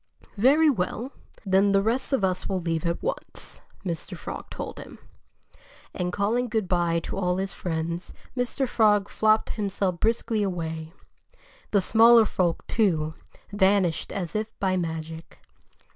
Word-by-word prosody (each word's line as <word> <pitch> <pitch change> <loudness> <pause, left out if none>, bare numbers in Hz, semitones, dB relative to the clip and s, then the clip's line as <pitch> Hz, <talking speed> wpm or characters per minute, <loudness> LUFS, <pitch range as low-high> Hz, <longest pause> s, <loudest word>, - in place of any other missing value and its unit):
"Very 290 +8 +5
well! 240 +1 -1 0.3
Then 195 +1 +3
the 195 0 +4
rest 235 +7 0
of 270 -7 +1
us 185 -1 0
will 190 -1 0
leave 165 -1 -1
at 170 - -2
once," - - -5 0.2
Mr. 170 -3 -4
Frog - - -7
told - - -6
him. - - -10 1.0
And 180 0 -2
calling 225 +6 0
good 215 -4 -1
by 175 -2 +1
to 195 - -5
all 180 -1 +1
his 195 +1 -2
friends, 170 0 -3 0.2
Mr. 250 +2 -1
Frog 210 -4 +3
flopped 215 0 +2
himself 195 -3 -1
briskly 225 -1 +1
away. 160 -4 -3 0.8
The 200 - +3
smaller 230 +3 +6
folk, 175 -5 0
too, 160 -8 +1 0.4
vanished 190 -4 +2
as 180 -3 -4
if 215 +1 -1
by 190 -1 +1
magic. 160 -2 -5
195 Hz, 145 wpm, -26 LUFS, 175-220 Hz, 1.0 s, smaller